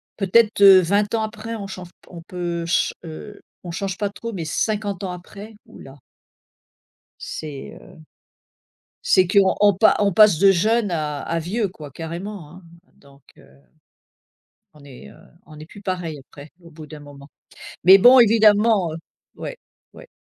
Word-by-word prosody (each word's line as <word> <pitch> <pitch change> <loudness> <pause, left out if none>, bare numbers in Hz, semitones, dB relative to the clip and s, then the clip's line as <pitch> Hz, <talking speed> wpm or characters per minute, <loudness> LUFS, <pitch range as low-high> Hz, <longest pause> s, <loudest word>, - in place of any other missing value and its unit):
peut-être, 215 +2 +1
heu, 195 -1 +8
20 200 +4 0
ans 220 - -1
après 220 +1 -7
on 200 -3 -7
change 185 -2 -10
p - - -29
on 170 -2 -11
peut 175 -1 -5
chan 170 - -1
heu, 170 +6 -11 0.2
on 175 - -6
change 190 +2 -5
pas 205 0 -2
trop, 230 +3 -8
mais 180 -6 -6
50 205 +3 -3
ans 185 - -4
après, 200 +4 -11
ouh - - -16
là! 135 +1 -14 1.2
C'est, 145 -3 -8
heu, - - -17 1.1
c'est 185 -2 +2
qu'on 200 +1 +3
pa 220 - +4
on 200 -3 +1
passe 210 -6 +5
de 195 -1 +5
jeune 215 +2 0
à 150 -3 -3
à 170 - -3
vieux 200 +7 -3
quoi 150 -6 -12
carrément, 170 +2 -8
hein, 180 +2 -15 0.3
donc, 140 0 -22 0.2
heu, - - -20 1.3
on 150 - -18
est, 125 - -14
heu, - - -18 0.3
on 155 -1 -14
est 155 - -11
plus 200 +3 -15
pareil 180 -6 -5
après 140 +2 -15
au 170 - -16
bout 155 -1 -12
d'un 150 0 -12
moment. 145 -1 -14 0.6
Mais 190 +3 +8
bon 250 +5 +7
évidemment, 215 -4 +3
heu 160 - -7 0.4
ouais. - - -8 0.4
Ouais. - - -15
185 Hz, 170 wpm, -21 LUFS, 160-210 Hz, 1.3 s, heu